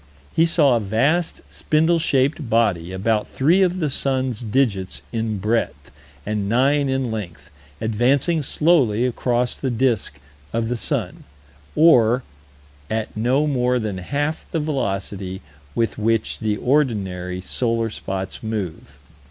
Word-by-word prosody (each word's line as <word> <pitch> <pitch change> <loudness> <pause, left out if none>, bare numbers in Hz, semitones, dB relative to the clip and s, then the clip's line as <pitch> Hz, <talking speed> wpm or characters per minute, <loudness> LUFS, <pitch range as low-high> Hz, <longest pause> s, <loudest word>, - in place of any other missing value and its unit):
He 165 +1 +4
saw 150 -6 +4
a - - +2
vast, 135 - 0
spindle 160 +2 +1
shaped 140 -2 +1
body, 100 -7 +1
about 105 +3 0
three 165 +8 +2
of 185 -1 +2
the 155 -4 0
sun's 130 -4 -1
digits 105 -5 -1
in 110 -2 -2
breadth 100 -9 -2 0.3
and 105 -2 -2
nine 135 +4 +2
in 130 -3 -1
length, 85 -7 -7 0.3
advancing 130 +9 +1
slowly 135 -7 +2
across 125 0 0
the 135 - -3
disk 120 -2 0 0.4
of 115 0 -1
the 125 - 0
sun, 115 - -3 0.5
or 125 -6 +5 0.7
"at 110 0 -3
no 125 +7 +2
more 125 -3 +1
than 105 -5 -3
half 145 - -2
the 165 - -1
velocity 100 -9 -3 0.4
with 115 -3 0
which 110 0 0
the 105 -2 -1
ordinary 100 -11 0
solar 115 +3 -1
spots 95 -2 -5
move." 105 -7 -5
115 Hz, 130 wpm, -21 LUFS, 105-140 Hz, 0.7 s, or